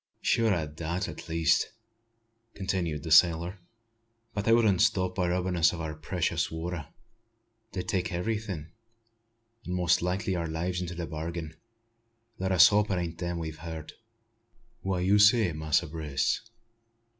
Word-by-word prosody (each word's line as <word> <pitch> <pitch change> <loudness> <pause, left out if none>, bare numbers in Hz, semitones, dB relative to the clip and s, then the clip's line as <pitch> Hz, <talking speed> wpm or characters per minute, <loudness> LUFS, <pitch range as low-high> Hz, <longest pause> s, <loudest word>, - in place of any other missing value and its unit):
"Sure 115 -1 +3
o' 85 -5 0
that, 80 +4 -4
at 80 0 -9
least," 80 +5 +2 0.8
continued 90 -6 -2
the 80 - -5
sailor. 85 +3 +5 0.7
"But 100 0 -3
they 115 - +3
wouldn't 110 -5 +4
stop 95 -4 +2
by 90 -2 0
robbin' 90 +1 0
us 80 -1 +4
o' - - -8
our 80 -1 -4
precious 80 +3 -1
water. 80 -2 -5 0.9
They'd 90 -2 -4
take 95 -2 -1
everything; 90 -3 -3 0.9
an' 90 - -5
most 90 -1 +2
likely 90 +2 -1
our 85 -1 -2
lives 90 +3 -2
into 90 -1 -5
the 85 0 -4
bargain. 80 +1 -5 0.8
Let 95 0 -1
us 90 +1 +8
hope 105 0 +2
it 95 - 0
ain't 85 -1 -4
them 85 -1 -2
we've 80 -2 -5
heard." 80 -1 -7 0.9
"Wha' 95 -1 -1
you 95 +3 +3
say, 105 -3 +5
Master 80 +2 +1
Brace? 75 +4 -2
85 Hz, 150 wpm, -28 LUFS, 80-95 Hz, 0.9 s, us